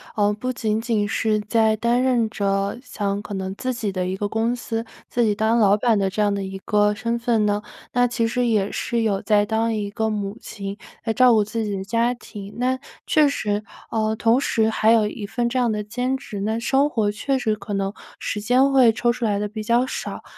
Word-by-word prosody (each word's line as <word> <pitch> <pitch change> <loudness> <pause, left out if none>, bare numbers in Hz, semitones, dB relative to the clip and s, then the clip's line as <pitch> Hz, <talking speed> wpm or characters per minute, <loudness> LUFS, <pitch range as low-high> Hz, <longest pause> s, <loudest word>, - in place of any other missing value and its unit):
呃， 205 -1 +3
不 255 +4 -3
仅 220 -2 -1
仅 225 -3 0
是 215 -1 +1
在 220 +1 +2
担 235 +3 +1
任 240 -4 +2
着 200 0 -1
像 200 -5 -2
可 205 - -7
能 190 0 -4
自 255 +4 -2
己 220 -4 -2
的 185 -1 -2
一 185 +1 -2
个 205 +1 -2
公 225 +2 0
司， 230 -1 -4 0.2
自 240 - +1
己 215 - +3
当 220 +3 +2
老 205 -3 +5
板 220 +1 +2
的 195 -1 0
这 210 +2 -1
样 205 -1 +3
的 200 - -3
一 190 0 -6
个 210 +1 +2
身 235 +2 -2
份 230 -3 +1
呢， 205 0 +1 0.3
那 245 0 +3
其 230 -1 0
实 245 +1 0
也 210 -4 +1
是 235 -2 -1
有 205 -3 +1
在 210 -2 +3
当 225 +1 +1
一 210 -2 -2
个 220 +2 -1
母 205 0 -3
亲 200 0 -7 0.3
来 225 - 0
照 250 +2 +5
顾 215 -2 +4
自 220 +1 -3
己 205 - -2
的 190 - -4
家 230 +4 +1
庭。 205 -4 -10
那 255 +1 +1 0.3
确 305 -2 +5
实 210 -6 -1 0.3
呃， 220 -1 0
同 230 +3 +3
时 220 -5 +1
还 220 0 +3
有 220 -2 +4
一 210 0 -6
份 235 +3 -1
这 260 - -2
样 240 -3 +2
的 210 0 -2
兼 250 +5 -2
职， 220 -6 -7
那 220 +2 -1
生 270 +4 +2
活 220 -7 0
确 265 +6 -1
实 220 -3 0
可 205 0 -7
能， 195 0 -1 0.3
时 210 - -3
间 250 +6 +3
会 255 -4 +6
抽 240 +2 +1
出 235 0 -3
来 205 -2 +1
得 210 - -1
比 215 +1 -6
较 240 +3 +2
少。 - - -5
220 Hz, 250 characters per minute, -22 LUFS, 205-235 Hz, 0.3 s, 会